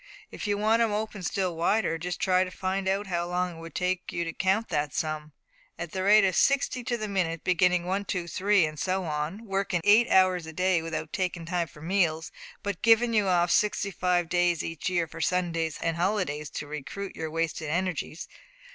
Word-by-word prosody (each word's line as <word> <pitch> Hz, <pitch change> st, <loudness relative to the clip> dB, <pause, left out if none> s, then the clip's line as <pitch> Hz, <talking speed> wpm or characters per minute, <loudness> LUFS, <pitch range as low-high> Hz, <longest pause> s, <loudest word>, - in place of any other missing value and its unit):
If -, -, -5 dB
you 205 Hz, 0 st, +1 dB
want 220 Hz, +2 st, +3 dB
'em 230 Hz, -2 st, +2 dB
opened 210 Hz, -3 st, -3 dB
still 185 Hz, -4 st, -1 dB
wider, 170 Hz, 0 st, +1 dB
just 175 Hz, +1 st, -4 dB
try 185 Hz, 0 st, +3 dB
to 185 Hz, -, -5 dB
find 190 Hz, +1 st, -2 dB
out 195 Hz, +2 st, 0 dB
how 175 Hz, -2 st, -2 dB
long 180 Hz, 0 st, -1 dB
it 165 Hz, -, -11 dB
would 165 Hz, 0 st, -10 dB
take 180 Hz, 0 st, -1 dB
you 170 Hz, -, -2 dB
to 165 Hz, -1 st, -4 dB
count 195 Hz, +5 st, 0 dB
that 150 Hz, -3 st, -1 dB
sum, 155 Hz, -2 st, -3 dB, 0.5 s
at 170 Hz, -1 st, -6 dB
the 190 Hz, -, -3 dB
rate 205 Hz, +2 st, +6 dB
of 185 Hz, -, +1 dB
sixty 275 Hz, -2 st, +2 dB
to 240 Hz, 0 st, -1 dB
the 215 Hz, -2 st, -4 dB
minute, 175 Hz, -5 st, -1 dB
beginning 180 Hz, -1 st, +2 dB
one, 195 Hz, +3 st, -1 dB
two, 180 Hz, -3 st, -2 dB
three, 195 Hz, +1 st, +3 dB
and 155 Hz, -1 st, -6 dB
so 190 Hz, 0 st, 0 dB
on, 155 Hz, +7 st, -3 dB
workin' 195 Hz, -3 st, -1 dB
eight 215 Hz, +5 st, +5 dB
hours 185 Hz, -3 st, +4 dB
a 160 Hz, -, -8 dB
day 185 Hz, 0 st, +2 dB
without 165 Hz, -1 st, -5 dB
takin' 180 Hz, -3 st, -2 dB
time 170 Hz, -1 st, -1 dB
for 150 Hz, +1 st, -14 dB
meals, 165 Hz, -3 st, 0 dB, 0.3 s
but 200 Hz, -3 st, -3 dB
givin' 230 Hz, +1 st, +4 dB
you 210 Hz, -3 st, +3 dB
off 175 Hz, -1 st, +3 dB
sixty 210 Hz, -1 st, +2 dB
five 180 Hz, -2 st, +1 dB
days 175 Hz, -1 st, +1 dB
each 165 Hz, +1 st, -3 dB
year 175 Hz, -2 st, +1 dB
for 165 Hz, +1 st, -9 dB
Sundays 165 Hz, -2 st, 0 dB
and 165 Hz, 0 st, 0 dB
holidays 175 Hz, -6 st, -1 dB
to -, -, -5 dB
recruit 150 Hz, +7 st, -6 dB
your 160 Hz, -, -4 dB
wasted 160 Hz, -1 st, -2 dB
energies." 175 Hz, -1 st, -2 dB
180 Hz, 210 wpm, -27 LUFS, 165-195 Hz, 0.5 s, rate